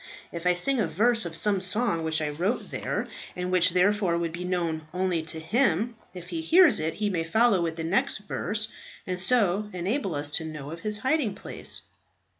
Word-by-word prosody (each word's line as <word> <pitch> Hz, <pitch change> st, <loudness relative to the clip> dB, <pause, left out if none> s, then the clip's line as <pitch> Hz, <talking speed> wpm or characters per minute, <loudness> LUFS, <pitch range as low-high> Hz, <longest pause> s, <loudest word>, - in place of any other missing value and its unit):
If 170 Hz, +1 st, -4 dB
I 180 Hz, -, +4 dB
sing 265 Hz, +9 st, +1 dB
a 210 Hz, -, +1 dB
verse 225 Hz, +7 st, +2 dB
of 165 Hz, -, -8 dB
some 200 Hz, +2 st, +1 dB
song 185 Hz, -3 st, 0 dB
which 160 Hz, -1 st, 0 dB
I 150 Hz, -, -1 dB
wrote 185 Hz, +11 st, -2 dB
there -, -, -3 dB, 0.3 s
and 180 Hz, 0 st, -3 dB
which, 180 Hz, -1 st, +5 dB
therefore, 185 Hz, 0 st, +2 dB
would 170 Hz, -1 st, -2 dB
be 175 Hz, +2 st, -6 dB
known 170 Hz, -3 st, -2 dB
only 180 Hz, -2 st, 0 dB
to 160 Hz, 0 st, -2 dB
him, 225 Hz, +3 st, +1 dB, 0.2 s
if 180 Hz, -2 st, -10 dB
he 330 Hz, -, -3 dB
hears 325 Hz, -, +6 dB
it 155 Hz, +1 st, -2 dB
he 210 Hz, -, -1 dB
may 170 Hz, -3 st, -1 dB
follow 210 Hz, +3 st, +3 dB
with 165 Hz, -1 st, -2 dB
the 165 Hz, -, -5 dB
next 170 Hz, +5 st, +1 dB
verse, 210 Hz, +1 st, -1 dB, 0.4 s
and 180 Hz, -1 st, -2 dB
so 210 Hz, -2 st, +3 dB
enable 190 Hz, -, -2 dB
us 145 Hz, 0 st, -2 dB
to 160 Hz, -, -1 dB
know 150 Hz, -2 st, -7 dB
of 165 Hz, -, -7 dB
his 210 Hz, +3 st, +1 dB
hiding 260 Hz, -2 st, 0 dB
place." -, -, -1 dB
180 Hz, 205 wpm, -26 LUFS, 165-215 Hz, 0.4 s, hears